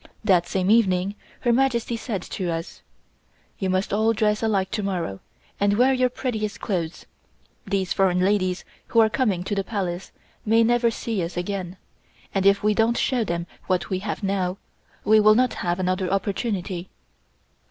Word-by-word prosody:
That 180 -5 +3
same 190 +1 +1
evening 195 -4 +3 0.3
Her 240 -2 +2
Majesty 240 -2 +1
said 220 -5 -4
to 185 -3 -4
us: 165 0 -5 0.8
"You 190 - -1
must 185 +2 0
all 220 +2 +3
dress 210 -1 +1
alike 200 -4 0
to 215 0 -1
morrow, 175 - -3 0.4
and 205 0 +2
wear 260 +3 +5
your 255 -1 +2
prettiest 220 -4 -3
clothes. 175 -6 -3 0.6
These 195 -1 0
foreign 185 -2 +2
ladies 185 -1 +1 0.2
who 230 - +2
are 220 -1 +5
coming 210 -10 0
to 190 - -3
the 195 -1 0
Palace 190 -4 -4 0.3
may 225 +1 +4
never 240 +1 +3
see 225 -2 -3
us 170 +1 -4
again, 185 0 -3 0.6
and 195 0 +2
if 200 0 +4
we 210 0 +3
don't 225 +2 +2
show 250 -3 +1
them 170 -4 -2 0.2
what 180 -3 0
we 185 - 0
have 205 +1 -4
now, 190 -1 -1 0.5
we 215 +1 +6
will 215 0 +6
not 250 +2 +3
have 175 +1 -1
another 185 0 0
opportunity." 195 -2 -2
200 Hz, 170 wpm, -24 LUFS, 185-220 Hz, 0.8 s, we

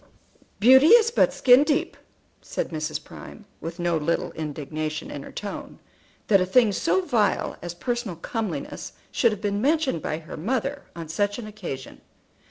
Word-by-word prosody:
"Beauty 265 +6 +7
is 460 +3 +7
but - - +3
skin 255 +2 +6
deep," 295 -1 0 0.5
said - - -4
Mrs. 155 -1 -3
Prime, 215 - -12
with 165 +1 -6
no 175 -2 0
little 160 +2 -1
indignation 155 0 -4
in 145 - -6
her - - -10
tone, 205 -1 -7 0.5
that 195 -3 +4
a - - +2
thing 230 +1 +4
so 355 - +1
vile 220 - +1
as 175 0 -6
personal 240 -1 -3
comeliness 220 +6 -5 0.2
should 235 - +3
have 210 -2 -5
been 205 0 -1
mentioned 285 - +1
by 155 - -2
her 160 -1 -9
mother 265 - -2
on 165 -2 -7
such 205 +6 -1
an 240 - -6
occasion. 180 -11 -7
205 Hz, 165 wpm, -25 LUFS, 160-250 Hz, 0.5 s, Beauty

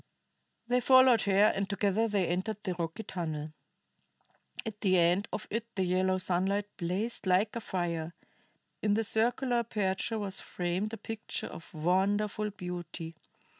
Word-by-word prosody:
They 250 +1 +3
followed 260 -2 +6
her, 200 +2 +5
and 195 0 -1
together 205 +2 +1
they 205 -4 +1
entered 190 +5 -2
the 185 - -1
rocky 170 +5 -4
tunnel. 155 -5 -4 1.1
At 215 -2 -6
the 185 -3 +4
end 175 +5 +3
of 210 - -4
it 230 +1 -2
the 190 - +1
yellow 185 +1 +2
sunlight 190 +2 +1
blazed 190 +5 -2
like 190 +5 +3
a 235 - -3
fire, 170 -4 -3 0.7
in 205 -1 +2
the 225 - +1
circular 240 +3 +1
aperture 215 -1 -1
was 200 -3 -2
framed 180 +4 -2
a - - -3
picture 225 +1 -5
of 165 - -9
wonderful 200 +6 +1
beauty. 175 -3 -6
195 Hz, 145 wpm, -31 LUFS, 180-220 Hz, 1.1 s, followed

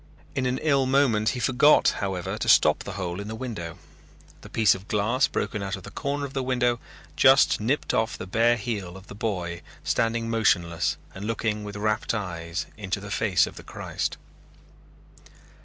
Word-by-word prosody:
In 130 -2 0
an 125 +1 0
ill 140 -4 +3
moment 130 -6 +3
he - - -3
forgot, 135 +5 +5
however, 95 -3 -2
to - - -2
stop - - +6
the 100 - -6
hole 90 -1 -4
in 100 - -6
the 110 - -5
window. 110 -9 -6 0.6
The - - -12
piece 110 -3 +4
of 95 +1 -9
glass 110 +5 +2
broken 105 - -2
out 100 0 -3
at 95 - -12
the - - -10
corner 140 0 -2
of 135 - -8
the 135 - -1
window 125 -2 +1 0.4
just 135 +1 +5
nipped 125 +8 0
off 110 0 0
the - - -6
bare 115 +5 +3
heel 100 -5 -4
of 95 - -13
the - - -10
boy 90 -6 -3 0.2
standing 115 0 0
motionless 90 -7 +1 0.2
and 95 +2 -7
looking 110 -1 -1
with 105 -1 -7
rapt 110 +2 0
eyes 85 -4 -4
into 100 -1 -3
the 100 0 -8
face 95 -8 +3
of - - -10
the - - -9
Christ. - - -4
110 Hz, 185 wpm, -26 LUFS, 95-120 Hz, 0.6 s, stop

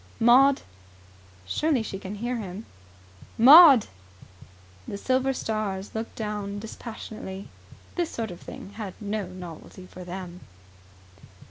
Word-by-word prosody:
"Maud!" 260 +4 +5 0.8
Surely 285 - 0
she 195 -2 -6
can 195 +1 -7
hear 240 +4 -3
him? 205 0 -7 0.7
"Maud!" 275 0 +9 1.0
The 200 - -5
silver 260 +4 +1
stars 215 -6 -3
looked 225 +1 -5
down 210 -2 -4
dispassionately. 215 -2 -8 0.4
This 345 -2 -1
sort 225 -4 -4
of 175 - -11
thing 195 - -10
had 205 -5 -6
no 210 -2 -3
novelty 180 0 -10
for 180 0 -11
them. 180 0 -7
215 Hz, 115 wpm, -26 LUFS, 190-240 Hz, 1.0 s, Maud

